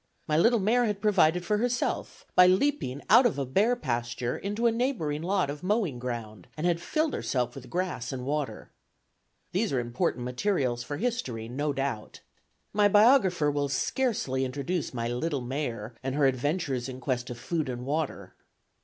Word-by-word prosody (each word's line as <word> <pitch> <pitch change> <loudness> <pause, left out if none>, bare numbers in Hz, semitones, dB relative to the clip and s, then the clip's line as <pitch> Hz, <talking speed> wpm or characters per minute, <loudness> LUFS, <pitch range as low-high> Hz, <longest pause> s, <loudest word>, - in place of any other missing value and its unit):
My 150 - +1
little 230 +9 +5
mare 230 +4 +3
had 210 -3 -1
provided 180 -5 +3
for 210 +3 +1
herself, 245 +1 -2
by 180 - +7
leaping 185 - +1
out 240 +4 +7
of 220 - -3
a 140 - -1
bare 205 - +2
pasture 120 - -2
into 210 +4 -3
a 235 - +5
neighboring 225 - -1
lot 180 -4 0
of 145 0 -8
mowing 185 - 0
ground, 115 -6 -6
and 155 - -2
had 170 -1 +1
filled 310 - 0
herself 125 -2 -1
with 135 -2 -10
grass 165 -9 -2
and 125 -2 -5
water. 145 0 -3 0.8
These 205 +5 0
are 130 - +1
important 120 0 -1
materials 125 -3 0
for 145 +4 -5
history, 210 - -2
no 145 +5 -1
doubt. 135 -5 -4 0.5
My 205 0 +5
biographer 205 - +5
will 145 -1 -1
scarcely 140 - 0
introduce 140 +5 -2
my 115 -2 -3
little 135 +4 -2
mare 120 -4 -4
and 135 0 -3
her 145 -1 +3
adventures 135 -1 0
in 130 0 -7
quest 125 -2 -2
of 120 - -6
food 155 +2 -2
and 125 0 -5
water. 140 - -3
145 Hz, 170 wpm, -28 LUFS, 125-200 Hz, 0.8 s, by